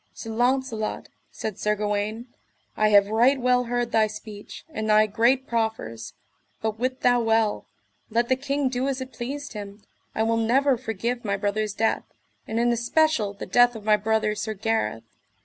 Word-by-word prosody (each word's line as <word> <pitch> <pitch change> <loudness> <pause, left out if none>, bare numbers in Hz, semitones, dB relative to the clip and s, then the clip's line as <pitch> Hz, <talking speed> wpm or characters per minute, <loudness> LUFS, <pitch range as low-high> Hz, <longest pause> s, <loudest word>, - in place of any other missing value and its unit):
Sir 225 - -7
Launcelot, 245 -1 -1 0.2
said 215 -3 -6
Sir 210 0 +1
Gawaine, 210 +2 -2 0.5
I 215 - +3
have 205 -1 +5
right 245 +5 +3
well 250 0 +2
heard 240 0 -1
thy 220 -1 +3
speech, 215 -1 -10
and 220 -9 -4
thy 215 0 +6
great 235 +5 +2
proffers, 220 - -3 0.4
but 220 0 -3
wit 255 +1 -2
thou 245 0 +4
well, 225 -2 +1 0.4
let 235 +2 +1
the 260 - +3
king 275 +1 -1
do 255 +1 -1
as 275 -1 -1
it 260 0 -7
pleased 280 +4 -5
him, 205 -1 -8 0.3
I 220 - +1
will 225 0 +1
never 260 +5 +3
forgive 235 +1 -3
my 200 -2 -1
brothers' 205 +1 -1
death, 225 +1 0 0.4
and 225 +1 -1
in 240 0 +3
especial 235 -2 +1
the 200 - -7
death 245 0 +4
of 220 - -8
my 215 0 +4
brother, 215 0 0
Sir 215 +1 -4
Gareth. 190 - -1
225 Hz, 175 wpm, -25 LUFS, 215-245 Hz, 0.5 s, thy